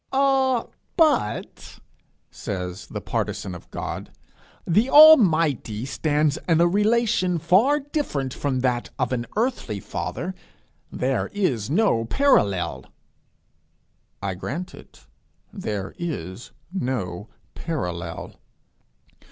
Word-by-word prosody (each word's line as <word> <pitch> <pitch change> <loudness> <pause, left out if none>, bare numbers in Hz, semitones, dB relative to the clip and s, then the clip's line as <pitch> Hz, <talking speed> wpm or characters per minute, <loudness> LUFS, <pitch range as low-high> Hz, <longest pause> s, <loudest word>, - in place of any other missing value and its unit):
'Ah, 265 -2 +2 0.3
but,' 305 - 0 0.5
says 90 -1 -5
the - - -5
partisan 95 - -3
of 90 - -11
God, - - -5 0.6
'the 215 +9 +2
Almighty 165 - +6
stands 150 +2 0
in 165 -1 +4
a 170 - +5
relation 210 -2 +2
very 205 - +3
different 140 - -2
from 130 -3 -2
that 125 -2 0
of 125 -1 -1
an 120 -2 -2
earthly 220 - -1
father: 180 - -4 0.6
there 130 -1 -1
is 135 - -1
no 155 - +2
parallel.' 105 - +1 1.4
I 100 -1 -1
grant 170 - -5
it: - - -16 0.5
there 100 -3 -4
is 115 - -5 0.2
no 110 - -3 0.2
parallel. 90 - -5
150 Hz, 100 wpm, -24 LUFS, -, 1.4 s, Almighty